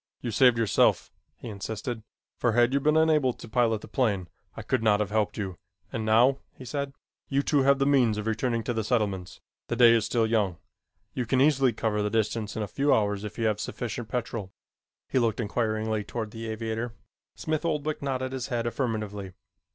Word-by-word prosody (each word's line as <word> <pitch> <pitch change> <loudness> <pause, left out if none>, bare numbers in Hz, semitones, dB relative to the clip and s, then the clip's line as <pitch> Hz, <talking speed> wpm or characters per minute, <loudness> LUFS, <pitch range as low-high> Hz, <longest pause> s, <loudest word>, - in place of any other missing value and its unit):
"You 120 - -3
saved 125 +2 +5
yourself," 115 -4 +2 0.3
he - - -9
insisted, 110 +2 -5 0.4
"for 120 -2 +2
had 120 +2 +3
you 140 - +3
been 150 +2 +3
unable 155 -5 +3
to - - -11
pilot 115 -1 +1
the - - -10
plane, 100 -9 0 0.3
I - - -5
could 130 - 0
not 105 -2 +3
have 105 -1 -1
helped 110 -1 0
you, 95 -5 -4 0.3
and 110 - -2
now," 120 +5 +4 0.2
he 130 - -11
said, 140 +1 -4 0.3
"you 140 0 +1
two 145 -1 +2
have 140 +1 +4
the 135 - +1
means 125 -6 +3
of 105 - -3
returning 115 +1 0
to 120 - -2
the 110 -1 -1
settlements. 105 -6 -1 0.3
The 120 - -1
day 120 -1 +7
is 115 -2 +3
still 115 +1 +1
young. 105 -6 +1 0.6
You 125 -3 -3
can 130 +2 +2
easily 135 -2 +4
cover 110 -1 -1
the 105 - 0
distance 110 0 -1
in 110 - -2
a - - -3
few 140 +8 +1
hours 105 -1 +2
if 105 0 -7
you 115 - -1
have 105 -1 +1
sufficient 120 0 -5
petrol." 115 -4 -3 0.6
He 130 - +1
looked 115 -2 +1
inquiringly 110 -1 -1
toward 110 +1 -5
the 115 0 -6
aviator. 110 +1 -3 0.4
Smith 155 0 -2
Oldwick 155 -2 -1
nodded 130 -2 -2
his 130 -2 -4
head 120 -2 -2
affirmatively. 110 -5 -3
115 Hz, 200 wpm, -27 LUFS, 110-130 Hz, 0.6 s, day